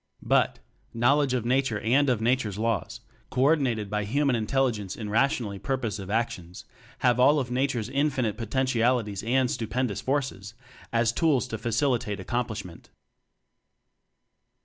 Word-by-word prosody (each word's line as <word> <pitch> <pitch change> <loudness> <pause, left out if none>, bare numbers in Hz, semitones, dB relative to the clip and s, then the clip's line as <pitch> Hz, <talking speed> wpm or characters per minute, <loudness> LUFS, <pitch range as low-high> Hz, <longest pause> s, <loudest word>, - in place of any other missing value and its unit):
But, - - +2 0.4
knowledge 130 +3 +3
of 120 -2 -2
Nature 125 -3 +1
and 130 +6 +2
of 120 -4 +1
Nature's 115 -4 0
Laws 115 -3 -2 0.3
co 130 - 0
ordinated 135 -8 +2
by 105 +1 -2
Hu 140 +8 0
man 135 -3 +3
Intelligence 115 -4 -1
in 105 -2 -6
rationally 115 -4 +1
purpos 125 -5 -2
ive 95 - -8
actions, 100 -5 -3 0.4
have 125 0 +4
all 145 +4 +5
of 130 -3 -2
Nature's 125 -3 0
in 140 +4 +1
finite 125 -7 -1
potentialities 120 -3 0
and 125 +3 +1
stupendous 115 -1 -2
forces 130 -7 -2 0.4
as 115 -1 +2
tools 135 0 +1
to 110 - -4
facilitate 115 -2 0
accom 120 +6 -2
plishment. 100 -6 -8
120 Hz, 145 wpm, -26 LUFS, 105-130 Hz, 0.4 s, all